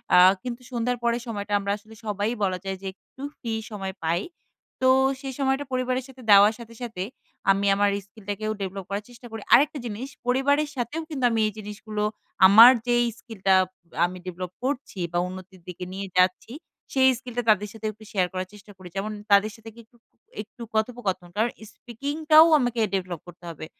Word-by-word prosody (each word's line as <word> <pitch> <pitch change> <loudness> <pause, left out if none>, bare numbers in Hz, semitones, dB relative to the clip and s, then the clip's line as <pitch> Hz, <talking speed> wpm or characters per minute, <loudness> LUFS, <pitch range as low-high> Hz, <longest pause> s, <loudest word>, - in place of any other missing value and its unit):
আ - - +8 0.3
কিন্তু 245 0 -5
সন্ধ্যার 245 +1 -1
পরের 235 0 +1
সময়টা 205 -2 -4
আমরা 200 0 -2
আসলে 215 +1 -17
সবাই 205 0 -1
বলা 185 -2 +1
যায় 195 0 -3
যে - - -10
একটু 260 +6 -18 0.2
ফ্রি 230 -3 -4 0.2
সময় 195 -2 -5
পাই। 170 +3 +1 0.6
তো 260 - +5 0.3
সেই 270 -1 -5
সময়টা 270 +1 +1
পরিবারের 255 0 -1
সাথে 260 -1 -14
দেওয়ার 205 +2 +8
সাথে, 230 0 -11
সাথে 220 -6 -4 0.5
আমি 195 +1 +1
আমার 205 0 +3 0.2
স্কিলটাকেও 205 +1 -5
ডেভেলপ 195 0 -4
করার 200 +1 -3
চেষ্টা 240 0 -13
করি। 225 - -6
আরেকটা 290 +3 +5
জিনিস 235 +4 -5 0.2
পরিবারের 285 +4 +2
সাথেও 250 +6 -3
কিন্তু 270 -5 -4
আমি 225 - +1
এই 215 - -4
জিনিসগুলো 210 0 -5 0.4
আমার 225 +6 +10 0.2
যে 240 - +3 0.2
স্কিলটা 195 -5 0 0.5
আমি 180 +1 -5
ডেভেলপ 180 0 -5
করছি 260 -7 -3
বা 175 - +2
উন্নতির 185 0 -10
দিকে 180 0 -7
নিয়ে 195 +1 -5
যাচ্ছি 185 +5 +2 0.4
সেই 265 -1 +5
স্কিলটা 245 -2 -4
তাদের 210 -1 +3
সাথে 220 -1 -9
একটু 215 +1 -17
শেয়ার 185 -3 +1
করার 185 0 -3
চেষ্টা 210 0 -14
করি। 185 -1 -11
যেমন 210 +2 -2 0.2
তাদের 200 +2 +5
সাথে 225 0 -11
গিয়ে 235 - -13
একটু, 235 +1 -28 0.4
একটু 220 +3 -11
কথোপকথন। 220 -5 -1
কারণ 225 +3 +1 0.2
স্পিকিং 270 +6 -6 0.2
টাও 315 +1 +10
আমাকে 245 -2 -1
ডেভেলপ 180 -4 -2
করতে 175 0 -14
হবে। 155 -1 -7
215 Hz, 180 wpm, -25 LUFS, 195-245 Hz, 0.6 s, আমার